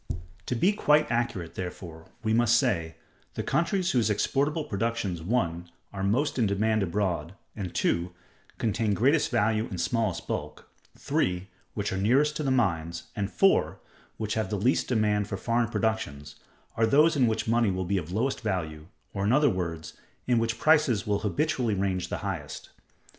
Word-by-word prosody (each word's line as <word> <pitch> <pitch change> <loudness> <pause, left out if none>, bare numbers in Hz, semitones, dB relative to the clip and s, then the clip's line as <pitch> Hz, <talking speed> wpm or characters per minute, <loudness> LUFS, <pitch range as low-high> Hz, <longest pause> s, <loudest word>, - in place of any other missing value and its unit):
To 125 - -1
be 185 - +3
quite 150 - +3
accurate, 115 -8 -1
therefore, 85 -3 -7 0.2
we 110 0 +1
must 120 0 +4
say: 80 -7 0 0.4
The - - -2
countries 175 +5 +1
whose 120 -4 +2
exportable 145 +9 0
productions 110 - -2
(1) 85 -4 -1 0.2
are 100 - -5
most 130 +9 +1
in 115 - +3
demand 110 +2 +1
abroad, 90 -2 -1 0.2
and 95 -5 -5
(2) 85 +1 0 0.5
contain 110 -1 0
greatest 140 +8 +3
value 110 +1 +1
in 95 - -6
smallest 95 +1 -1
bulk, - - -5 0.3
(3) 90 +1 -1 0.3
which - - -2
are - - -2
nearest 135 +10 +3
to - - -3
the 135 - 0
mines, 85 -9 0
and 100 -1 -2
(4) 195 0 +3 0.4
which 110 -1 -2
have 110 -3 -2
least 105 +6 +1
demand 105 -4 +1
for 100 - -4
foreign 115 +2 0
productions, 75 -12 -2 0.4
are 115 0 +2
those 150 +6 +4
in 130 -4 +3
which 110 0 -1
money 115 -1 +3
will 95 -1 -2
be 100 +2 0
of 85 0 -8
lowest 120 +8 -1
value, 80 -8 -3 0.3
or, 100 - -2
in 105 - +2
other 145 0 +4
words, 85 -4 -4 0.3
in 120 -2 +2
which 115 0 -1
prices 150 -7 +3
will 105 -1 0
habitually 120 0 0
range 95 -2 -1
the - - -2
highest. - - -5
110 Hz, 170 wpm, -27 LUFS, 95-120 Hz, 0.5 s, must